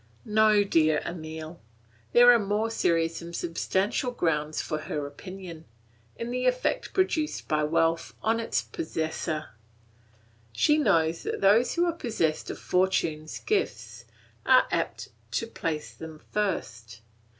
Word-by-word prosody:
No, 215 -1 +4
dear 155 -5 +3
Emile; 160 -1 -7 0.5
there 245 0 +8
are 240 - +5
more 210 +2 -1
serious 165 -5 +1
and 170 0 -8
substantial 190 +8 -1
grounds 155 -9 -1
for 155 - -2
her 155 -2 -4
opinion, 170 +2 -9 0.5
in 230 +1 -5
the 250 +1 0
effect 255 - 0
produced 320 -5 0
by 150 0 +1
wealth 165 +1 +1
on 225 +1 +2
its 230 - -1
possessor. 160 -1 -3 1.0
She 300 - +3
knows 165 - +2
that - - -3
those 210 +5 +4
who 345 +1 +3
are 340 - 0
possessed 215 - -1
of - - -5
fortune's 165 -4 0
gifts 415 -1 -2 0.4
are - - +6
apt - - -2 0.2
to - - 0
place 160 -9 -4
them 160 -1 -10
first. 115 - -3
170 Hz, 130 wpm, -27 LUFS, 155-225 Hz, 1.0 s, there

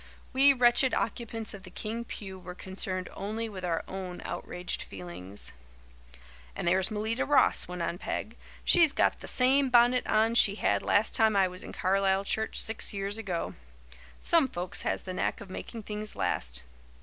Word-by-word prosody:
We 275 +2 +6
wretched 250 0 +4
occupants 225 -3 -3
of 200 - -9
the 185 - -11
King 225 +5 -5
pew 190 -5 -8
were 180 0 -9
concerned 185 0 -4
only 220 +3 -4
with 195 -4 -8
our 170 -2 -1
own 185 -2 -6
outraged 180 0 -4
feelings. 90 +1 -6 1.0
"And - - -3
there's 185 +2 +3
Melita 220 +2 -1
Ross," 290 -1 +3
went 180 -1 -4
on 170 +1 -3
Peg. 225 - -4 0.3
"She's 330 -4 +5
got - - +2
the - - -9
same 265 +2 +4
bonnet 245 +1 +4
on 220 +1 +3
she 205 -4 +5
had - - +1
last 210 +2 +2
time 220 -2 +3
I 195 -1 +4
was 180 0 -8
in - - -8
Carlisle 195 +1 +2
church 220 +2 0
six 220 -1 +1
years 200 +2 -3
ago. 185 -6 -3 0.7
Some 330 -5 +4
folks 180 -6 -3
has - - -2
the 185 - -5
knack - - -1
of 195 - -10
making 225 +3 -7
things 210 +1 -4
last. - - -1
200 Hz, 175 wpm, -29 LUFS, 185-230 Hz, 1.0 s, We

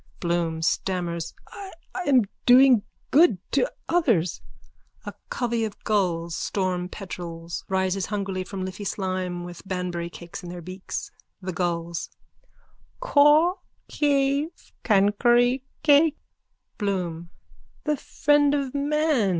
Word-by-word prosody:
BLOOM: 170 -2 -1
(Stammers.) 170 -2 -1 0.2
I 395 -1 -8 0.4
am 260 -4 +5 0.2
doing 250 -2 +7 0.3
good 310 - +6
to - - +1 0.2
others. 235 - +1 0.6
(A - - -5 0.2
covey 235 -2 -1
of 215 -2 -4
gulls, 170 -5 0
storm 180 -2 -1
petrels, 170 -4 -6
rises 190 0 0
hungrily 195 -3 -2
from 190 0 -5
Liffey 185 +2 -6
slime 185 -3 -2
with 175 -1 -9
Banbury 180 -2 -3
cakes 170 +1 -9
in 175 - -8
their 175 -1 -7
beaks.) 185 +2 -6 0.3
THE 185 -1 -5
GULLS: 170 -1 -2 0.9
Kaw 310 -3 +5 0.3
kave 285 +2 0
kankury 240 +5 +3 0.2
kake. 300 +1 +5 0.6
BLOOM: 175 -5 -2 0.5
The 300 -1 +1
friend 290 +1 +2
of 275 -3 -2
man. 290 -5 +1
195 Hz, 110 wpm, -25 LUFS, 175-275 Hz, 0.9 s, doing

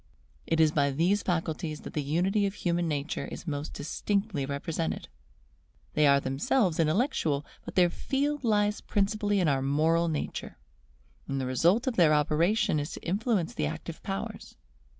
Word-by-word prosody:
It 165 - +1
is 160 -1 +5
by 140 -2 +2
these 175 +9 +2
faculties 160 -2 -2
that - - -9
the 150 - -1
unity 185 +8 +1
of 195 - -5
human 175 -2 0
nature 150 0 -2
is - - -8
most 145 -2 -4
distinctly 195 0 -2
represented: 155 +4 -3 0.8
they 150 -1 +4
are 140 0 +6
themselves 165 - +1
intellectual, 160 - +1 0.2
but - - -8
their 180 -2 +4
field 285 +5 -1
lies 210 -2 +2
principally 205 0 0
in 180 - +2
our 135 -2 +2
moral 160 +5 +2
nature, 155 -3 -4 0.7
and 135 0 -2
the 130 - -2
result 170 - +2
of 260 -3 -1
their 160 -4 +6
operation 155 +4 +2
is 145 +3 -4
to - - -9
influence 200 -1 0
the 75 - -1
active - - -6
powers. - - -6
165 Hz, 160 wpm, -29 LUFS, 150-205 Hz, 0.8 s, are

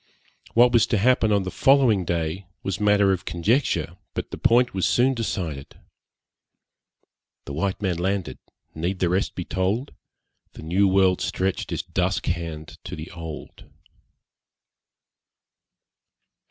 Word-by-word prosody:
What 120 +1 +6
was 120 -2 +4
to 115 - +1
happen 115 0 +3
on 100 -2 +2
the 95 - -4
following 130 -9 +4
day 85 +2 -2 0.2
was 95 - -3
matter 105 -1 +4
of 95 -2 -1
conjecture, 85 - 0 0.2
but - - -4
this - - -7
point 120 +1 +4
was 95 -1 +1
soon 130 +2 +3
decided. 85 - -4 1.7
The 70 - -6
white 95 +6 -2
man 90 -3 0
landed; 95 +1 -2 0.3
need 85 +4 -2
the 90 -2 +1
rest 95 +3 0
be 90 - -4
told? 100 +9 -1 0.6
The - - -11
new 95 +5 +2
world 95 -1 +3
stretch'd 95 0 -2
its - - -2
dusk - - -1
hand 80 -3 -4
to - - -6
the 80 +2 -8
old. 80 -3 -9
95 Hz, 135 wpm, -24 LUFS, 85-105 Hz, 1.7 s, What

